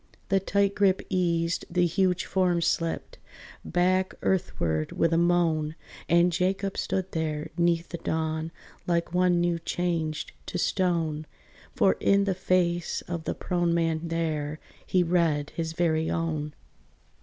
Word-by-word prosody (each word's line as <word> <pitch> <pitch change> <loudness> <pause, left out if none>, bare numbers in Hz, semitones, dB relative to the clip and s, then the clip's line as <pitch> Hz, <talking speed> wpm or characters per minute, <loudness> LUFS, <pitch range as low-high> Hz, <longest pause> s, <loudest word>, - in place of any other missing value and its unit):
The 195 -1 +3
tight 200 +1 +1
grip 195 -2 +2
eased, 170 -2 0
the 175 0 +2
huge 180 +1 +1
form 180 -2 +1
slipped 165 0 -1 0.4
Back 185 +2 +1
earthward 80 - 0
with 165 0 +2
a - - +3
moan, 165 -3 +2 0.3
And 170 +1 +5
Jacob 190 +3 0
stood 190 0 -2
there 155 -2 -2
'neath 170 -1 +1
the 170 - -5
dawn, 160 0 -2 0.4
Like 170 0 0
one 180 -1 +3
new 170 -1 +1
changed 165 -3 -2 0.2
to - - -3
stone; 165 -5 0 0.5
For - - +3
in 200 0 +4
the 195 -1 +1
face 180 -2 0
of 170 -2 -4
the - - -2
prone 175 -1 0
man 165 -1 0
there 155 -2 -2 0.3
He 180 -1 +3
read 165 -4 +1
his 165 -1 -3
very 160 -2 +1
own. 155 -3 -2
170 Hz, 140 wpm, -27 LUFS, 160-180 Hz, 0.5 s, And